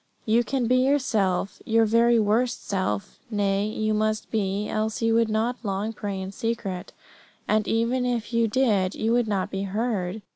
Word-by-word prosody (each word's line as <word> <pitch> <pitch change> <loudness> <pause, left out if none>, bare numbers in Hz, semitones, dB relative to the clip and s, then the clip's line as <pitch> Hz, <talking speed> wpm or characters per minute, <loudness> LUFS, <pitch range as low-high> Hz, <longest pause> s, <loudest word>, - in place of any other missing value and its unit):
You 230 +2 +3
can 260 0 -1
be 250 +2 +3
yourself, 225 -9 +1
your 225 0 +3
very 230 +2 +4
worst 225 +3 +1
self; 185 - -2
nay, 200 -1 0
you 215 0 -1
must 215 0 -1
be, 205 -1 -1
else 220 +1 -2
you 225 0 +3
will 230 0 +3
not 220 +3 0
long 205 0 -2
pray 200 -3 -4
in 190 0 -5
secret, 205 -4 -4 0.6
and 215 -1 +1
even 235 +3 +1
if 240 -1 -2
you 230 0 +3
did 210 -6 +1
you 220 +1 0
would 240 -1 +2
not 195 -3 -1
be 195 - -3
heard. 205 -1 -2
220 Hz, 175 wpm, -25 LUFS, 200-230 Hz, 0.6 s, very